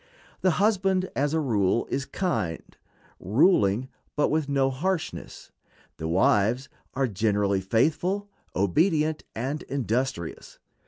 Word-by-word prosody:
The 185 -3 +2
husband, 190 -2 +2
as 145 +3 +1
a - - +2
rule, 115 -6 +1
is 140 - -1
kind; 135 - -3 0.4
ruling, 115 - +3 0.3
but 145 - +2
with 155 -2 0
no 135 -1 +2
harshness. 170 +6 -4 0.5
The 80 - -4
wives 105 +9 +2 0.3
are 135 0 +1
generally 100 -2 +1
faithful, 160 - +1 0.3
obedient, 155 - +2
and 135 +7 -3
industrious. 125 -8 -3
135 Hz, 110 wpm, -26 LUFS, 105-160 Hz, 0.5 s, ruling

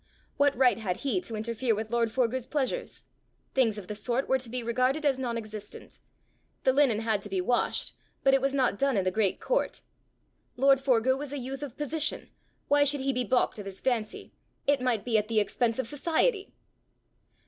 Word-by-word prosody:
What 285 -2 +3
right 255 -2 +4
had 185 -5 -2
he 280 +6 -1
to 230 -10 -6
interfere 230 +2 -1
with 220 +1 -5
lord 235 -1 +2
Forgue's 250 0 0
pleasures! 300 - -2 0.5
Things 230 -5 +2
of 205 - -7
the - - -4
sort 240 +5 -2
were 265 - +2
to 245 -2 -8
be 250 +1 -3
regarded 255 +6 0
as 270 -2 +2
non 240 -3 -2
existent! 215 -2 -9 0.6
The 260 - +4
linen 260 -6 +3
had 220 -3 0
to 205 - -9
be 190 -1 -1
washed, 240 +7 0 0.3
but 270 - +5
it 270 - +4
was 275 +1 +1
not 255 -7 +1
done 275 -4 +2
in 195 - +2
the 185 - 0
great 200 -1 +1
court! - - -1 0.7
Lord 270 +1 +4
Forgue 260 0 +2
was 290 -1 -6
a 290 - -4
youth 265 +1 -5
of 275 -4 -7
position: 300 +1 -2 0.4
why 290 0 +4
should 285 -1 +2
he 270 0 0
be 250 0 +1
balked 245 -1 +1
of 200 - -7
his 195 -1 -8
fancy! 235 -5 -2 0.3
It 285 -2 +2
might 245 -5 0
be 225 -3 +3
at 210 - -4
the 225 -1 +2
expense 225 +2 0
of 260 - -1
society! 335 - 0
255 Hz, 205 wpm, -28 LUFS, 225-275 Hz, 0.7 s, but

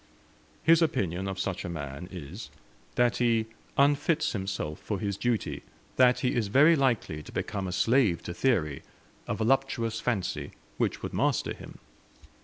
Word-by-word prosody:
His 165 +1 +6
opinion 95 - 0
of 95 -1 -4
such 95 -1 -2
a - - -4
man 70 +1 -6
is, 90 +4 -8 0.5
that 120 -1 +3
he 115 -2 +2 0.3
unfits 145 +3 +3
himself 95 -7 -3
for 105 -3 -3
his 100 0 -2
duty, 115 +2 -1 0.3
that 125 -1 +5
he 125 - +1
is 115 -4 0
very 145 +10 +6
likely 120 - 0
to - - -12
become 100 -2 -3
a - - -3
slave 115 -2 +2
to 85 - -5
theory 85 - +1 0.5
a - - -1
voluptuous 115 -1 +1
fancy, 105 -7 -2 0.3
which - - 0
would - - -4
master - - +1
him. - - -11
110 Hz, 155 wpm, -28 LUFS, 90-130 Hz, 0.5 s, His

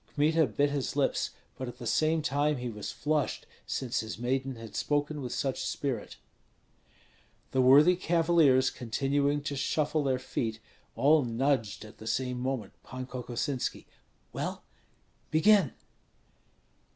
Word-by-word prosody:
Kmita 155 +1 +3
bit 145 +6 +1
his 140 -2 -2
lips, 140 -2 +1 0.3
but 130 - -3
at 120 0 -8
the 120 - -8
same 155 +6 +2
time 145 +1 +1
he 125 0 -4
was 105 -2 -6
flushed, 150 -1 -1 0.2
since 125 -3 -1
his 110 -1 -5
maiden 130 +2 -1
had 115 -2 -10
spoken 145 0 -1
with 125 -2 -5
such 135 -2 -2
spirit. 130 -7 -3 1.3
The 130 - +2
worthy 145 +8 +7
cavaliers 165 -7 +3
continuing 140 +4 0
to 145 0 -3
shuffle 150 +2 0
their 130 -2 +1
feet, 115 -3 -3 0.4
all 150 +1 +4
nudged 115 -3 0
at 105 - -14
the 110 - -9
same 125 +1 -1
moment 130 -5 -3
Pan 130 0 -6
Kokosinski: 125 +1 -3 0.5
"Well, - - -4 0.7
begin!" 175 -1 +4
135 Hz, 135 wpm, -30 LUFS, 125-145 Hz, 1.3 s, worthy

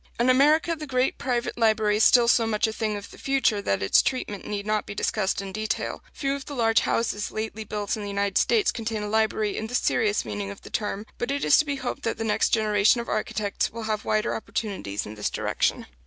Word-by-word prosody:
In 245 +2 +4
America 305 +5 +4
the 305 -1 -8
great 255 -1 0
private 245 -3 -2
library 215 -2 +3
is 215 - +3
still 240 -2 +6
so 230 -1 +4
much 215 -1 +1
a 220 - -2
thing 215 -1 -2
of 200 - -9
the - - -14
future 270 -6 +1
that 100 - -1
its 95 - +5
treatment 210 -6 -3
need 205 -1 -3
not 215 0 -1
be 200 - -6
discussed 200 -1 -1
in 195 - -6
detail. 215 +2 -3
Few 275 -1 -2
of 280 -1 -5
the 285 - -6
large 225 -3 +3
houses 210 -3 -1
lately 220 0 -4
built 210 -1 -3
in 215 - -6
the 205 - -5
United 200 -1 0
States 435 -5 +3
contain 225 -2 -3
a - - -3
library 215 -1 +1
in 220 - -3
the 245 - -4
serious 210 - +1
meaning 100 -2 -4
of 100 - -10
the - - -11
term; 205 0 -2
but 240 - -2
it 280 +1 -1
is - - +6
to 310 - +3
be 285 -1 -2
hoped 260 -2 -4
that 230 - -2
the - - -3
next 215 -2 +1
generation 215 +1 +3
of 235 - -5
architects 210 -1 -1
will 230 0 -6
have 215 -1 -2
wider 215 0 0
opportunities 200 - -4
in 105 - -8
this 105 -1 -2
direction. - - -1
220 Hz, 240 wpm, -25 LUFS, 205-240 Hz, -, still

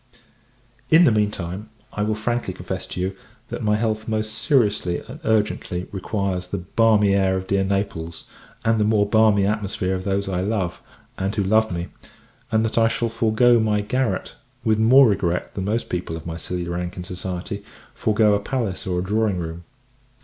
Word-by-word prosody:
In 160 +2 +7
the 145 - +6
mean 105 -1 +2
time, 95 +2 -6 0.2
I 105 - -3
will 105 +1 +1
frankly 110 -3 -2
confess 95 +1 -5
to - - -6
you, 95 +1 -2 0.3
that - - -5
my 105 0 +2
health 110 0 -1
most 110 -1 -1
seriously 105 - +2
and - - -9
urgently 105 -4 0
requires 95 -2 -2
the 100 - -3
balmy 105 +2 +3
air 95 -1 +2
of 95 - -4
dear 95 0 +1
Naples, 95 -4 -2 0.4
and 115 0 +3
the - - +3
more 105 -1 +3
balmy 105 -2 +4
atmosphere 100 -2 -1
of 95 0 -3
those 100 0 -1
I 90 -2 -1
love, 95 -3 -2 0.4
and 95 +2 -1
who 100 - +1
love 110 +2 +3
me; 85 0 -4 0.6
and 110 0 +2
that 115 +1 +1
I 115 - +5
shall 115 0 -1
forego 115 +2 +3
my 105 -1 +1
garret 110 -2 -1 0.3
with 110 -1 +2
more 130 +4 +7
regret 90 -4 0
than 95 - -3
most 110 +3 -1
people 85 -2 -3
of 80 - -10
my 85 -1 -4
silly 90 0 -4
rank 85 +1 -4
in 90 - -4
society 90 +3 -5 0.3
forego 105 -1 +3
a 100 - +2
palace 105 -4 -3
or 90 -1 0
a 90 - 0
drawing 105 0 +1
room. 85 0 -6
100 Hz, 185 wpm, -22 LUFS, 95-110 Hz, 0.6 s, In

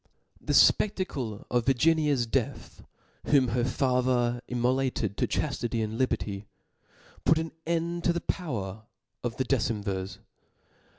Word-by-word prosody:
The - - -2
fpedacle 140 - +2
of 120 -1 +1
Virginia's 145 -1 +3
death, 115 - -3 0.4
whom 135 -4 +4
her 120 +1 0
father 125 -1 +1
immolated 125 -4 0
to - - +1
qhaftity 120 -6 -1
and 110 0 -3
liberty, 105 -6 -1 0.8
put 160 - +4
aa 160 0 -2 0.2
end 170 +1 -1
to - - +5
the 170 - -2
power 110 - -4 0.4
of 120 -1 -3
the 130 - 0
decemvirs. 100 -7 -1
125 Hz, 120 wpm, -28 LUFS, 115-145 Hz, 0.8 s, to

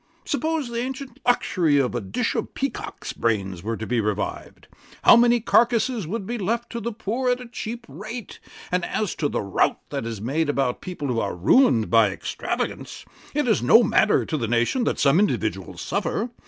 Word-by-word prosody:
Suppose 310 0 -1
the 235 0 -3
ancient 260 0 -6
luxury 175 -10 +2
of 135 -3 +1
a 120 - -2
dish 95 -1 -2
of - - -4
peacock's - - -4
brains 95 -6 -1
were 110 +3 -3
to 110 - -5
be 120 -1 0
revived, 105 -1 -4 0.4
how - - +9
many 240 0 +5
carcases 235 -3 +2
would 205 +3 -4
be 240 +3 -4
left 230 +5 -2
to 235 - -4
the 235 +1 -3
poor 230 +4 -2
at 245 0 +1
a 250 - -8
cheap 235 0 -6
rate: 215 - -8 0.3
and 180 0 +1
as 210 0 -1
to 145 - -1
the - - -1
rout 100 -1 +1
that 115 - -3
is 115 -3 -5
made 145 +8 -1
about 135 -4 0
people 175 -6 -5
who 120 -3 0
are 100 -4 -2
ruined 115 - +4
by 115 -3 +5
extravagance, 95 - -4 0.3
it 295 -3 +1
is 220 -5 +3
no 225 - +6
matter 215 0 +3
to 155 - -2
the 115 - -2
nation 120 - +1
that - - 0
some 140 +5 +4
individuals 210 - -1
suffer. 240 - -2
190 Hz, 195 wpm, -24 LUFS, -, 0.4 s, how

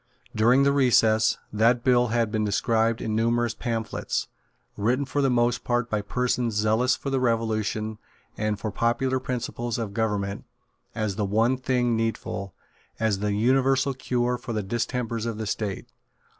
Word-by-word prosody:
During 120 +5 +4
the 140 - +4
recess, 115 -5 +3 0.2
that 115 +3 +3
bill 125 -1 +4
had 115 -1 0
been 110 -1 0
described 115 +2 +1
in 110 -1 -1
numerous 115 +1 +1
pamphlets, 115 -2 -3 0.5
written 125 +7 0
for 145 +1 -1
the 135 - +3
most 120 0 +1
part 120 -1 -1
by 105 -1 0
persons 120 +2 -1
zealous 110 +4 +2
for 140 - -5
the 135 - +1
Revolution 110 -2 -1 0.4
and 105 -1 -1
for 110 - -3
popular 120 +5 0
principles 120 -2 -3
of 110 -4 -4
government, 100 -3 -2 0.5
as 105 -3 -2
the 105 - 0
one 110 +6 +2
thing 125 -2 0
needful, 110 -4 -3 0.4
as 110 -3 +1
the 105 0 -1
universal 135 +5 +2
cure 125 -1 -1
for 120 0 -6
the 105 -2 -1
distempers 115 +2 -2
of 115 -2 -3
the 110 - -4
State. 105 -1 -3
115 Hz, 155 wpm, -25 LUFS, 110-125 Hz, 0.5 s, During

